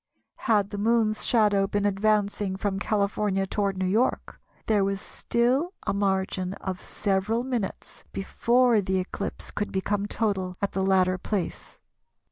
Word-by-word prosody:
Had 205 -3 +3
the 205 - -4
Moon's 220 0 +2
shadow 205 -4 +3
been 205 0 -1
advancing 205 -1 +1
from 195 0 -2
California 200 -2 0
toward 195 0 -1
New 185 - 0
York, 220 +7 0 0.2
there 210 -3 +3
was 195 0 -1
still 255 - 0
a - - 0
margin 190 -1 0
of 185 -1 -5
several 205 +4 0
minutes 245 -6 -4
before 235 +3 +2
the 190 0 -1
eclipse 185 +2 -4
could 205 - -3
become 200 +1 -1
total 190 -5 -1
at 200 - -1
the 190 - -2
latter 185 -1 +3
place. 200 -5 -4
200 Hz, 140 wpm, -26 LUFS, 190-215 Hz, 0.2 s, Had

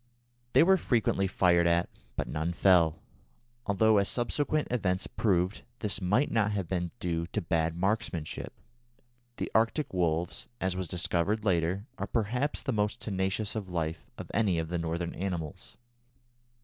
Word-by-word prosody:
They - - +7
were 190 +2 +5
frequently 110 - +1
fired 90 -2 +3
at, 85 +1 +3 0.3
but - - -2
none 80 +3 -2
fell, 85 -4 +4 0.6
although, 105 +1 +4
as 100 - +1
subsequent 145 +5 0
events 95 -6 0
proved, 95 -2 0 0.2
this 105 -3 -2
might 105 +10 +2
not 105 -2 +2
have 100 -4 -2
been 90 -1 -1
due 85 -1 -1
to - - -2
bad 80 -1 0
marksmanship. 95 -4 -2 0.9
The - - -3
Arctic 115 +5 +1
wolves, 85 -1 0
as 95 -1 0
was 95 -1 -3
discovered 90 +5 0
later, 90 +1 +1
are - - -2
perhaps 125 +6 -1
the 130 - -1
most 105 0 0
tenacious 95 +1 -1
of 105 -4 -4
life 80 -5 -3
of - - -8
any 100 -5 +2
of 80 -1 -2
the 85 0 -1
Northern 85 +1 -2
animals. 85 -5 -5
95 Hz, 150 wpm, -30 LUFS, 85-105 Hz, 0.9 s, They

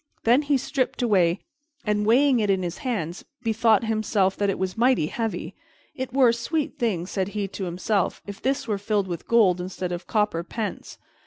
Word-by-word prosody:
This 250 +6 +4
he 285 -1 +3
stripped 260 -1 -1
away 185 -5 +3 0.4
and, 210 -1 +1
weighing 260 +2 +5
it 210 -2 0
in 190 -1 +2
his 175 -1 -4
hands, 190 - -3 0.2
bethought 225 -1 +3
himself 215 -3 +1
that 200 -1 +1
it 195 - -1
was 185 0 -2
mighty 240 -7 +3
heavy. 225 +6 -3 0.4
"It 260 -1 -5
were 260 -2 +5
a - - +3
sweet 285 +6 -2
thing," 200 -8 0
said 190 0 -2
he 200 -1 -1
to 195 - -5
himself, 185 +3 -1
"if 200 -1 -8
this 270 0 -1
were 210 -3 -1
filled 205 -1 0
with 170 -2 -6
gold 195 -6 +4
instead 180 0 -4
of 175 0 -5
copper 210 -6 0
pence." 215 +4 -5
210 Hz, 190 wpm, -25 LUFS, 185-235 Hz, 0.4 s, weighing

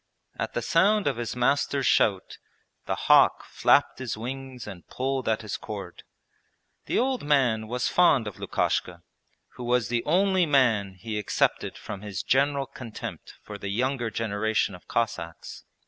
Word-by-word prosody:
At - - -3
the - - -1
sound 200 +5 +3
of - - 0
his 120 0 -4
master's 135 +2 +1
shout 95 -5 +2 0.5
the - - 0
hawk - - +5
flapped - - +2
his 125 -5 -4
wings 130 +1 -6
and 95 -4 -10
pulled 130 -1 -2
at 110 0 0
his 105 - -4
cord. 100 -5 -8 0.9
The - - 0
old 260 +1 +1
man 125 -7 +2
was 125 +2 -1
fond 145 -9 +4
of 105 - -7
Lukashka, - - -1 0.5
who 125 - -6
was 120 -2 +1
the 120 -1 0
only 185 +1 +3
man 115 -9 +2
he 105 +3 -4
excepted 105 - 0
from 100 -2 -7
his 105 -3 -5
general 140 +1 +2
contempt 120 -4 -8
for 105 -1 -8
the 100 - -5
younger 120 +2 -1
generation 110 -1 -1
of 90 - -13
Cossacks. 115 -8 -3
120 Hz, 155 wpm, -26 LUFS, 105-135 Hz, 0.9 s, hawk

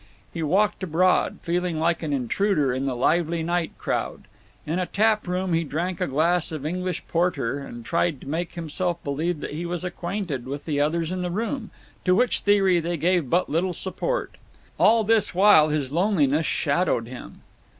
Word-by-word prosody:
He 170 - -4
walked 195 +9 +1
abroad, 185 +1 +2
feeling 175 -1 -1
like 165 +1 +1
an 155 -3 -3
intruder 140 - +1
on 130 +2 -2
the 130 - -1
lively 165 +5 +1
night 170 0 -2
crowd; - - -3 0.4
in 160 +4 -1
a 180 - -1
tap 215 -1 +1
room 180 0 -1
he 165 0 +2
drank 170 +4 -3
a - - +1
glass 165 +5 +1
of 155 -3 -5
English 180 +2 -3
porter 160 -7 0
and 120 -4 -9
tried 170 -4 0
to - - -11
make 165 +4 -3
himself 170 +1 -2
believe 155 +3 -2
that - - -5
he 160 +3 -4
was 175 0 -3
acquainted 175 -7 -4
with 140 +2 -5
the 150 -3 -1
others 160 +3 0
in 185 0 -2
the 180 - -2
room, 225 +5 -3 0.3
to 180 -1 +3
which 245 +4 +2
theory 195 -3 +3
they 170 +1 -2
gave 170 -3 +1
but 180 +6 +2
little 175 +4 0
support. - - -3 0.4
All 225 +1 +5
this 220 -3 +2
while 185 -5 +6
his 145 -3 -1
loneliness 160 -4 +2
shadowed 145 -5 +1
him. 125 +1 -10
170 Hz, 180 wpm, -24 LUFS, 150-185 Hz, 0.4 s, while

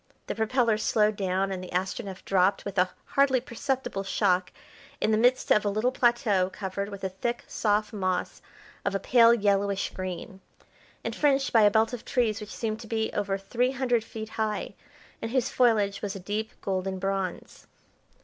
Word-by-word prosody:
The - - -3
propellers 225 0 +1
slowed 215 -1 +2
down 195 0 0
and 185 -1 -4
the 180 - -8
Astronef 190 +2 -3
dropped 190 0 +2
with 200 -2 -2
a 180 0 +3 0.2
hardly 275 -2 +3
perceptible 250 -3 -3
shock 185 -2 +1 0.5
in 220 - +1
the 215 - +3
midst 250 +2 +3
of 210 - +5
a 205 - +1
little 215 +5 +1
plateau 235 -7 +2
covered 200 +1 -4
with 200 -1 -9
a 190 - 0
thick, 235 +6 -3
soft 210 0 0
moss 185 -3 -2 0.4
of - - -1
a - - +1
pale 235 0 +6
yellowish 200 -3 +1
green, 185 +1 -6 0.6
and - - -3
fringed 280 -2 +2
by 225 - +6
a 210 - +7
belt 220 +4 +2
of 245 - -5
trees 225 -4 0
which 210 - -8
seemed 220 -1 -3
to 230 - -10
be 220 0 -1
over 200 -1 -1
three 245 +6 0
hundred 245 -4 +1
feet 220 -1 -7
high, 215 -2 -2 0.5
and 225 - -3
whose 260 +1 +1
foliage 215 -5 +2
was 205 -1 -3
a - - -5
deep 210 +4 -4
golden 190 0 -2
bronze. 195 -1 -4
210 Hz, 180 wpm, -27 LUFS, 195-235 Hz, 0.6 s, a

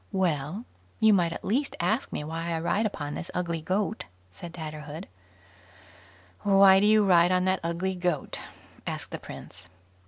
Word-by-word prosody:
"Well, 180 - -1 0.3
you 220 -1 +6
might 175 -4 +3
at - - -6
least 270 +7 0
ask 215 +9 0
me - - -3
why 165 +2 -4
I 165 - -1
ride 205 +6 +1
upon 145 -7 -5
this 170 - -6
ugly 170 -2 -1
goat", 200 +6 -1 0.3
said 165 - -9
Tatterhood. 155 -1 -7 1.3
"Why 195 -1 +7
do 205 - +4
you 215 -1 +5
ride 175 -2 +5
on 185 0 +2
that 190 0 +2
ugly 170 +3 -1
goat?" 175 -4 -2 0.5
asked - - -5
the - - -5
prince. - - -10
180 Hz, 160 wpm, -27 LUFS, 165-195 Hz, 1.3 s, Why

